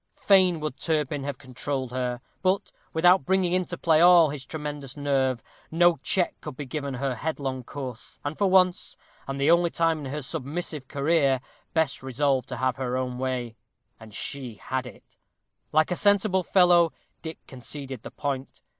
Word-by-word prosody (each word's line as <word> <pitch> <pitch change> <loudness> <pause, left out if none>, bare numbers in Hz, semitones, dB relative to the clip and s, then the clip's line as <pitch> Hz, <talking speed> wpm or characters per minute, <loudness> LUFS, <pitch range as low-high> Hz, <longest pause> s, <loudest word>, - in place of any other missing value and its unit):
Fain 185 -4 +4
would 150 -3 -4
Turpin 150 -3 -1
have 140 -2 -4
controlled 130 -1 -4
her; 125 -1 -2 0.2
but, 190 +1 +1 0.2
without 175 +1 +5
bringing 185 +3 +1
into 180 -1 -1
play 160 -2 +3
all 175 -3 +7
his 135 -3 -7
tremendous 145 -3 -6
nerve, 135 -4 0 0.3
no 175 +1 +4
check 180 +6 0
could 130 - -8
be 145 - -5
given 140 0 -4
her 135 +1 -1
headlong 135 -1 -3
course, 130 -2 -8
and 145 +2 -2
for 200 - +2
once, 185 -1 +3 0.3
and 135 0 -4
the 140 +4 +4
only 170 0 +4
time 165 -1 +1
in 135 -3 -6
her 150 0 -4
submissive 145 +2 -4
career, 140 -2 +2 0.4
Bess 160 -4 +1
resolved 130 0 0
to - - -4
have 130 0 0
her 130 -1 -2
own 125 -1 -3
way 125 -3 -2 0.4
and 110 -1 -12
she 125 +1 -5
had 130 +4 -4
it. 115 - -15 0.5
Like 155 +3 +3
a - - +1
sensible 200 -1 +3
fellow, 175 -2 +4 0.3
Dick 160 -1 -6
conceded 130 0 -8
the - - -8
point. 140 -2 -5
145 Hz, 170 wpm, -26 LUFS, 130-170 Hz, 0.5 s, all